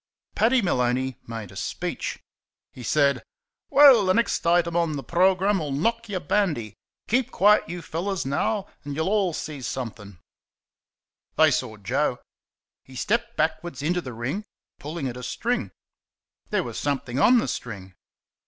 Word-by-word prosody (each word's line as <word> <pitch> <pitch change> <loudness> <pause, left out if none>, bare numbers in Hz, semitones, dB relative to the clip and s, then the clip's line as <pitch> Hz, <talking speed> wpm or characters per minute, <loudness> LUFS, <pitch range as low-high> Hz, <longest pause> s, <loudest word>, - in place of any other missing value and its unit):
Paddy 240 +2 +3
Maloney 130 -5 0
made 115 -4 -6
a - - -14
speech. - - -4 0.5
He 125 - -11
said: 140 +3 +2 0.5
"Well, 275 -6 +8
the 185 -1 +2
next 235 -6 +1
item 170 0 +3
on 170 -2 +1
the 140 - -5
programme'll 185 0 +2
knock 230 +11 -1
y' 195 - -2
bandy. 155 - 0 0.3
Keep 250 +2 +1
quiet, 210 -5 +4
you 175 0 -6
fellows, 185 +2 -3
now, 195 +9 0 0.2
an' 145 -1 -5
y'll 190 +4 +1
see 150 -2 -5
somethin'." 115 -7 -6 1.2
They 155 -1 +6
saw 125 -5 -2
Joe. 125 +6 0 0.7
He 130 - -15
stepped 235 - -1
backwards 155 -2 -1
into 175 +3 +1
the 130 -6 -7
ring, 130 - -3 0.4
pulling 150 -1 -4
at 125 -1 -5
a - - -7
string. 210 - -2 0.8
There - - +1
was - - -5
something 135 -3 -2
on 245 - +6
the 230 - +1
string. 100 -5 -6
155 Hz, 145 wpm, -25 LUFS, 130-195 Hz, 1.2 s, Well